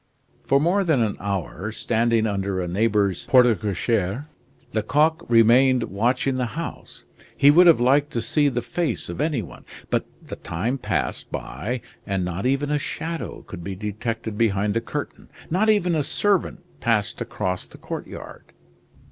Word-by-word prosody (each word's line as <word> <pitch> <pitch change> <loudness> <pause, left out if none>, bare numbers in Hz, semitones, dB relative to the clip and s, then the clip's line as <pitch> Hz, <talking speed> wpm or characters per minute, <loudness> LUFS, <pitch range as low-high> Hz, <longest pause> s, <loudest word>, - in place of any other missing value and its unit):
For 140 - +4
more 180 +7 +2
than 155 -9 +2
an 105 -2 -1
hour, 100 +1 -3
standing 115 0 +1
under 100 -2 -1
a 90 - -2
neighbor's 100 0 +1
porte 125 -6 +5
cochere, 105 +4 -1 0.5
Lecoq 150 +9 +2
remained 120 +2 +5
watching 125 +6 +1
the 125 0 -3
house. 165 - -7 0.3
He 140 - +7
would 175 +4 +7
have 165 - +7
liked 140 +4 +3
to 115 - 0
see 145 -2 +2
the 120 -3 -2
face 130 - -2
of 85 - -4
any 150 -7 0
one; - - -12 0.3
but - - 0 0.2
the - - -7
time 115 +12 -3
passed 105 -6 -2
by 120 +3 -4 0.3
and 95 -3 -1
not 90 +6 -2
even 140 +2 0
a 150 - +1
shadow 165 +4 -5
could 85 -3 -9
be 95 +1 -5
detected 110 +2 -4
behind 105 -2 +2
the 115 - 0
curtain; 145 +5 -6 0.2
not 205 +6 +2
even 190 -5 +3
a 155 - +2
servant 190 +6 0 0.2
passed 105 +3 0
across 90 -1 -3
the - - -14
courtyard. - - -8
115 Hz, 160 wpm, -23 LUFS, 100-145 Hz, 0.5 s, He